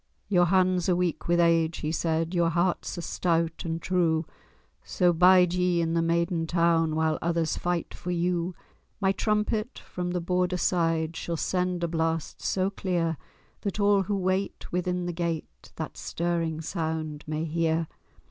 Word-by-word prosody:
"Your 180 Hz, -3 st, +4 dB
hands 185 Hz, 0 st, +2 dB
are 180 Hz, -, +4 dB
weak 175 Hz, -3 st, -1 dB
with 175 Hz, 0 st, +3 dB
age," 165 Hz, -1 st, +3 dB
he 155 Hz, -, -1 dB
said, 165 Hz, +1 st, 0 dB
"Your 170 Hz, -2 st, +3 dB
hearts 175 Hz, +2 st, 0 dB
are 175 Hz, -, -4 dB
stout 165 Hz, -2 st, 0 dB
and 165 Hz, 0 st, -2 dB
true; 165 Hz, -3 st, +1 dB, 0.6 s
So 180 Hz, -1 st, +2 dB
bide 180 Hz, +1 st, +6 dB
ye 180 Hz, -1 st, +2 dB
in 165 Hz, -1 st, 0 dB
the 170 Hz, -, +2 dB
maiden 165 Hz, 0 st, 0 dB
town, 165 Hz, -2 st, +2 dB
While 160 Hz, 0 st, +1 dB
others 165 Hz, -2 st, 0 dB
fight 175 Hz, -1 st, -2 dB
for 180 Hz, -, -7 dB
you. 175 Hz, 0 st, 0 dB, 0.4 s
My 195 Hz, -2 st, +3 dB
trumpet 215 Hz, +3 st, -1 dB
from 180 Hz, -1 st, -5 dB
the 180 Hz, 0 st, -1 dB
Border 180 Hz, +1 st, 0 dB
side 165 Hz, -2 st, +1 dB
Shall 170 Hz, 0 st, -3 dB
send 180 Hz, 0 st, -1 dB
a -, -, +2 dB
blast 165 Hz, -1 st, -2 dB
so 190 Hz, +1 st, 0 dB
clear, 175 Hz, -4 st, -1 dB, 0.5 s
That 200 Hz, 0 st, -3 dB
all 205 Hz, -1 st, +4 dB
who 200 Hz, +2 st, -1 dB
wait 190 Hz, +1 st, -2 dB
within 180 Hz, 0 st, -1 dB
the 175 Hz, -, -3 dB
gate 165 Hz, -2 st, -4 dB
That -, -, -6 dB
stirring 165 Hz, -2 st, -2 dB
sound 160 Hz, -3 st, -3 dB
may 155 Hz, +1 st, -2 dB
hear. 165 Hz, 0 st, 0 dB
170 Hz, 165 wpm, -27 LUFS, 165-180 Hz, 0.6 s, bide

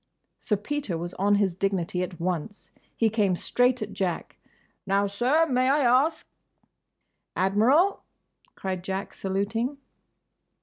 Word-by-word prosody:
Sir 210 Hz, -, 0 dB
Peter 215 Hz, -, -3 dB
was 175 Hz, +2 st, -5 dB
on 205 Hz, +1 st, +3 dB
his 200 Hz, -3 st, +1 dB
dignity 185 Hz, -1 st, -1 dB
at 180 Hz, -1 st, -5 dB
once. 180 Hz, +4 st, -4 dB, 0.3 s
He 230 Hz, -, +3 dB
came 205 Hz, -4 st, +1 dB
straight 245 Hz, +5 st, +1 dB
at 210 Hz, -, -7 dB
Jack. 185 Hz, -3 st, -3 dB, 0.5 s
"Now, 200 Hz, +1 st, +2 dB
sir—may 255 Hz, +5 st, +2 dB
I 290 Hz, +2 st, +3 dB, 0.2 s
ask—?" 320 Hz, 0 st, -6 dB, 1.1 s
"Admiral," 235 Hz, -, +3 dB, 0.5 s
cried 185 Hz, -2 st, -4 dB
Jack, 190 Hz, +1 st, -4 dB
saluting. 215 Hz, +8 st, -2 dB
200 Hz, 120 wpm, -26 LUFS, 190-250 Hz, 1.1 s, on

